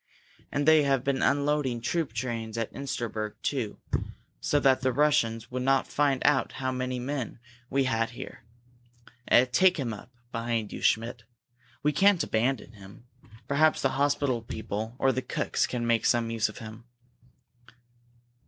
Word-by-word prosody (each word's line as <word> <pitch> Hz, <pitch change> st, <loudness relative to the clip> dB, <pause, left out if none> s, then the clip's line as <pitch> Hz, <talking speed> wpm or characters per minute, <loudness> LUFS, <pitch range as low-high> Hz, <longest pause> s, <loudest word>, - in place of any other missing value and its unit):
And 145 Hz, 0 st, -1 dB
they 160 Hz, -1 st, +7 dB
have 135 Hz, -3 st, +1 dB
been 135 Hz, -1 st, 0 dB
unloading 140 Hz, -3 st, +1 dB
troop 150 Hz, +4 st, -1 dB
trains 115 Hz, -1 st, -4 dB
at 115 Hz, -1 st, -3 dB
Insterberg, 120 Hz, -6 st, -4 dB
too 125 Hz, -7 st, -2 dB, 0.6 s
so 145 Hz, -, +1 dB
that 135 Hz, -2 st, +3 dB
the 130 Hz, 0 st, +2 dB
Russians 125 Hz, -5 st, +1 dB
would 130 Hz, 0 st, -2 dB
not 135 Hz, +1 st, +2 dB
find 140 Hz, -3 st, +1 dB
out 140 Hz, -2 st, +3 dB
how 130 Hz, 0 st, -2 dB
many 130 Hz, 0 st, -2 dB
men 130 Hz, -1 st, -4 dB, 0.3 s
we 135 Hz, +1 st, +2 dB
had 115 Hz, -3 st, 0 dB
here. 120 Hz, -, -9 dB, 0.8 s
Eh 125 Hz, -, +6 dB
take 180 Hz, +9 st, +3 dB
him 125 Hz, -6 st, -2 dB
up 105 Hz, +4 st, -11 dB, 0.2 s
behind 115 Hz, -2 st, -2 dB
you, -, -, -6 dB
Schmidt! 115 Hz, +1 st, +1 dB, 0.6 s
We 150 Hz, -, +3 dB
can't 195 Hz, +3 st, +4 dB
abandon 115 Hz, +1 st, -1 dB
him. 100 Hz, +3 st, -14 dB, 0.4 s
Perhaps 155 Hz, +3 st, +3 dB
the 135 Hz, -, +3 dB
hospital 140 Hz, -2 st, +1 dB
people 110 Hz, 0 st, -5 dB
or 135 Hz, -, +3 dB
the 130 Hz, -, -2 dB
cooks -, -, -1 dB
can 120 Hz, -2 st, -3 dB
make 115 Hz, -1 st, +2 dB
some 115 Hz, -1 st, +2 dB
use 115 Hz, -1 st, +1 dB
of 110 Hz, -, -11 dB
him." 110 Hz, +1 st, -10 dB
130 Hz, 155 wpm, -28 LUFS, 115-140 Hz, 0.8 s, they